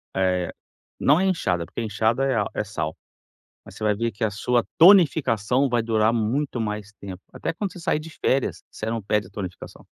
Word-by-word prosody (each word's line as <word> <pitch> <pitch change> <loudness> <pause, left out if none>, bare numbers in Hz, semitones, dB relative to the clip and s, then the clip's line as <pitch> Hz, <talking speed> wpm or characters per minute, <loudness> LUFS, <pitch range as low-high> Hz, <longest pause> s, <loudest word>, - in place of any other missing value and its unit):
eh, 90 -2 +1 0.5
não 145 +3 +4
é - - +2
inchada, 90 - 0
porque - - -6
a 115 - -2
inchada 110 +5 +1 0.3
é - - -1
sal, 105 - -4 0.7
mas - - -13
você - - -8
vai 105 -1 +2
ver 115 +2 -1
que 110 +3 -5
a 110 - +2
sua 120 +4 +1
tonificação 140 - +5
vai 120 -1 +2
durar 110 0 +2
muito 120 +4 -1
mais 105 -1 -4
tempo, 95 -2 -8
até - - -3
quando 195 +2 -3
você - - -10
sair 160 -2 0
de 160 +1 -9
férias, 135 -3 -1
você 110 - -6
não 115 0 -2
perde 105 +1 0
a - - -17
tonificação. 95 -4 -8
115 Hz, 200 wpm, -24 LUFS, 105-135 Hz, 0.7 s, tonificação